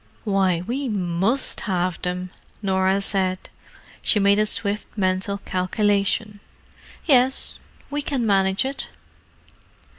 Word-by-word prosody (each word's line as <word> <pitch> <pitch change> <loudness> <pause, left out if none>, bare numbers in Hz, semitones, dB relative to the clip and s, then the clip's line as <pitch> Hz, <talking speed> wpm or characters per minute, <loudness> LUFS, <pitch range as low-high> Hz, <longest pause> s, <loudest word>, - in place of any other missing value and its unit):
"Why 195 -5 +1
we 260 +4 -3
must 195 +5 +2
have 180 -3 -1
them," 180 0 -3 0.3
Norah 190 0 +1
said. 190 -2 -1 0.5
She - - +2
made 200 +1 +4
a 215 - +2
swift 210 -1 -2
mental 190 +1 0
calculation. 205 +2 0 0.7
"Yes—we 265 +2 +1
can 275 -4 -2
manage 195 +1 +2
it." 275 +1 -4
200 Hz, 100 wpm, -23 LUFS, 185-220 Hz, 0.7 s, made